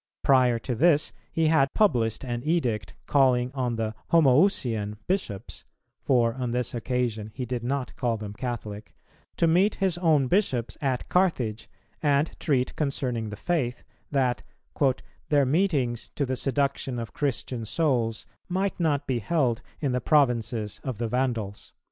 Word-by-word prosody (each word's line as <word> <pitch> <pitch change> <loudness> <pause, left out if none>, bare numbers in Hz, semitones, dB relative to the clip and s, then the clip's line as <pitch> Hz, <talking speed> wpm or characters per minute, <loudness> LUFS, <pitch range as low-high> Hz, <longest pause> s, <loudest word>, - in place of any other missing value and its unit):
Prior 130 -3 +4
to 125 +2 -3
this 150 +4 +3 0.2
he 165 - +1
had 145 -4 +3
published 120 - +2
an 120 -2 -3
edict 135 -10 -1
calling 130 -3 +3
on 125 -3 -1
the 110 -1 -2 0.2
"Homoüsian" 130 - +3
Bishops 125 - -3 0.4
(for 120 -3 +2
on 125 -1 -3
this 125 0 -1
occasion 120 -3 -2
he 125 - -3
did 120 -1 -3
not 130 +1 -2
call 120 -2 0
them 105 -1 -7
Catholic), 110 -3 -6 0.4
to - - +3
meet 180 +6 +3
his 185 -3 0
own 155 -6 +3
bishops 130 - 0
at 130 -3 -1
Carthage 130 - 0 0.3
and 145 +1 +2
treat 130 -5 0
concerning 125 -6 -2
the 105 - -7
faith, 125 -3 -1 0.3
that 130 -4 +1 0.9
"their 145 -2 +4
meetings 135 - 0
to 140 - 0
the 130 0 -2
seduction 135 -1 -1
of 115 -1 -5
Christian 130 -4 -2
souls 115 -2 0 0.2
might 190 +2 -1
not 150 -4 +1
be 130 -3 0
held 120 -1 0 0.2
in 140 -4 0
the 125 0 0
provinces 115 -7 +1
of 130 -5 -4
the 115 +1 -2
Vandals." 115 -5 -2
130 Hz, 150 wpm, -26 LUFS, 115-150 Hz, 0.9 s, Prior